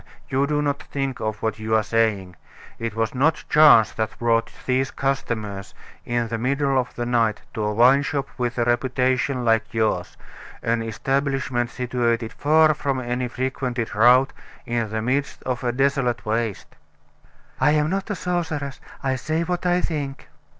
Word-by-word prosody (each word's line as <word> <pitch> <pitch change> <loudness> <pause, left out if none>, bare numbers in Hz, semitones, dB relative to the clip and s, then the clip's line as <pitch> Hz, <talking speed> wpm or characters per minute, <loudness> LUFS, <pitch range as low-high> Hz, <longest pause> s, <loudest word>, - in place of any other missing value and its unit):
you 135 +2 +1
do 150 0 0
not 145 -1 -1
think 135 -2 -4
of 110 -1 -4
what 110 -1 -1
you 110 0 0
are 110 - +3
saying. 105 -5 0 0.4
It 115 -2 -4
was 115 0 -1
not 145 +5 +1
chance 150 -8 +7
that 110 -1 -3
brought 115 -1 +1
these 130 +1 +1
customers, 110 -7 -3 0.3
in 120 -1 -1
the 115 0 -3
middle 135 +2 +1
of 125 - -4
the 120 - -3
night, 115 -3 +1
to 110 - -3
a 105 - 0
wine 125 +6 +5
shop 140 -1 -2
with 120 -1 -2
a 120 - +2
reputation 125 +1 +1
like 115 0 +1
yours 110 -1 0 0.5
an 115 0 +1
establishment 135 +2 -1
situated 120 -2 -1
far 155 +1 +4
from 140 -3 -2
any 125 0 -2
frequented 125 -1 -3
route 125 +5 +5 0.3
in 115 -2 -1
the 110 +1 -3
midst 135 +4 -1
of 125 0 -3
a 120 - +1
desolate 135 -2 0
waste." 110 -1 -2 0.8
"I'm 150 +3 +3
not 195 +2 -2
a 205 - -1
sorceress; 160 -6 -3 0.2
I 130 -1 0
say 155 +5 -1
what 180 +1 -2
I 180 0 +2
think." 145 -5 -4
125 Hz, 165 wpm, -23 LUFS, 115-140 Hz, 0.8 s, chance